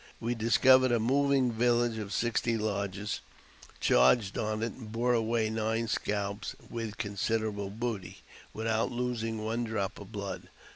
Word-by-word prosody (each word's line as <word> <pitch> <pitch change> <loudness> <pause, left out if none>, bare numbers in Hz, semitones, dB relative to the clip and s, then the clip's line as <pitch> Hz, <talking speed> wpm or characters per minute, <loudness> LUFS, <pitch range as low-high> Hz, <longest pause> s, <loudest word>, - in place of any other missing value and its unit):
We 115 +1 -1
discovered 130 +3 +5
a 120 - +3
moving 135 +1 +2
village 120 0 +2
of 100 -2 -5
sixty 120 0 +1
lodges, 100 -1 -2 0.6
charged 105 -6 +4
on 110 0 -1
it, 115 - -2
and 110 -4 -10
bore 120 +2 +1
away 115 -1 +1
nine 110 +1 0
scalps, 100 -1 -2 0.2
with 115 -3 -4
con 100 -3 -4
siderable 105 -1 -1
booty, 115 -6 -4 0.3
without 110 0 0
losing 115 -3 -2
one 115 +2 -1
drop 110 -4 -2
of - - -11
blood. - - -5
115 Hz, 145 wpm, -30 LUFS, 110-120 Hz, 0.6 s, discovered